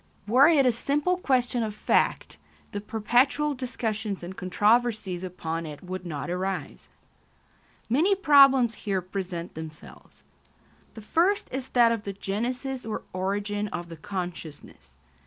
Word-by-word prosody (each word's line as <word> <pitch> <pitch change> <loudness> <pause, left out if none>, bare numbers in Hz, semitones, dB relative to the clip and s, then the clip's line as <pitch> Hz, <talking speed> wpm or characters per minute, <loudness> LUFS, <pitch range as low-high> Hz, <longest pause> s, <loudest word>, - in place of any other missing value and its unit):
Were 255 +7 +6
it 300 -5 +5
a 250 - +5
simple 290 +9 0
question 250 -7 +1
of 215 -2 -3
fact, - - 0 0.3
the 205 - -4
perpetual 245 +8 +1
discussions 225 -6 -3
and 180 +2 -7
controversies 210 -1 +1
upon 165 -3 -4
it 150 +2 -9
would 185 0 -6
not 145 -5 -4
arise. 185 +1 -4 1.0
Many 320 - +3
problems 275 - +6
here 200 -3 -2
present 180 -2 -5
themselves. 155 -1 -11 0.7
The 220 - -8
first 350 - +1
is 260 0 -4
that 235 -1 +6
of 230 -2 -1
the 200 -1 -5
genesis 250 +7 -3
or 220 -1 -4
origin 205 +2 -2
of 175 -3 -6
the 165 - -8
consciousness. 160 - -7
210 Hz, 135 wpm, -26 LUFS, 185-255 Hz, 1.0 s, Were